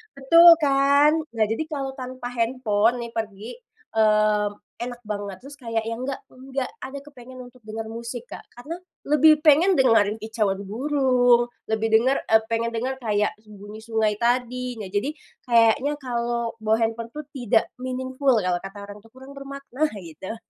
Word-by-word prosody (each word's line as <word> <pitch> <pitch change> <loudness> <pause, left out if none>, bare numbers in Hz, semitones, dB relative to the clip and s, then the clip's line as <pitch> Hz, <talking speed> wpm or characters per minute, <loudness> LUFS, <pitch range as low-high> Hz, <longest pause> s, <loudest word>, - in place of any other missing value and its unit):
betul 335 +6 +6
kan? 280 +1 +4 0.2
Nah, 220 - +2
jadi 225 - -1
kalau 275 -4 -4
tanpa 255 -1 -6
handphone 230 -1 +1
nih 235 - -8
pergi, 215 0 -5 0.5
mmm, 215 -1 +3 0.3
enak 245 0 -6
banget 205 -2 -5
terus 280 +3 -12
kayak 230 -4 -3
yang 230 +2 -4
enggak 275 0 -4
enggak 265 0 -5 0.2
ada 275 +1 -6
kepengen 260 -3 -13
untuk 245 -1 -13
dengar 220 +1 -6
musik, 235 +1 -7
Kak. - - -9
Karena 290 +8 -8 0.3
lebih 300 +1 +5
pengen 310 +3 +5
dengerin 220 -4 +3
kicauan 215 -3 -1
burung, 245 -1 +2 0.2
lebih 220 0 +1
denger 260 +5 +3
eee, 220 0 +5
pengen 230 +1 0
dengar 260 +3 -2
kayak 210 -3 0
bunyi 210 0 -11
sungai 220 -2 0
tadi. 245 +1 -1
Nah 190 -3 -7
jadi, 265 +10 -2 0.3
kayaknya 235 +5 +3
kalau 235 -2 -2
bawa 220 0 +1
handphone 230 +1 -3
tuh 300 - -5
tidak 240 -5 0
meaningful 260 +1 0
kalau 180 -1 0
kata 195 +2 -10
orang 205 +1 -10
itu, 225 - -19
kurang 265 +2 -12
bermakna, 275 +1 -3 0.2
gitu 170 +7 -8
240 Hz, 160 wpm, -24 LUFS, 220-265 Hz, 0.5 s, betul